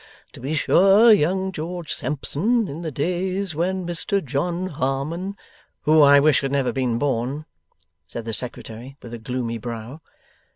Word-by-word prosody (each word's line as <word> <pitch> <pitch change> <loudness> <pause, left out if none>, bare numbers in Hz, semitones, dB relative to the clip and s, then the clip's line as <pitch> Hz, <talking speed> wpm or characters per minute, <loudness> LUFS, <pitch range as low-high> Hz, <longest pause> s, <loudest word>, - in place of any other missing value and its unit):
To - - -11
be 140 +5 -3
sure, 195 +8 +6
young 190 +1 +1
George 175 -1 -5
Sampson, 185 - 0
in 155 +2 -6
the 165 - -3
days 180 +5 -2
when 180 +3 -1
Mr 175 +2 -1
John 170 +7 -1
Harmon 155 +5 -2 0.2
' - - -35
'Who 155 +1 +5
I 140 0 +8
wish 145 0 +4
had 135 -1 -2
never 140 -2 +1
been 125 -4 0
born!' 135 +3 -1 0.6
said 115 - -7
the 115 - -4
Secretary, 125 +2 -5
with 120 - -9
a 120 - -6
gloomy 115 0 -3
brow. 120 +5 -7
150 Hz, 160 wpm, -23 LUFS, 130-180 Hz, 0.6 s, I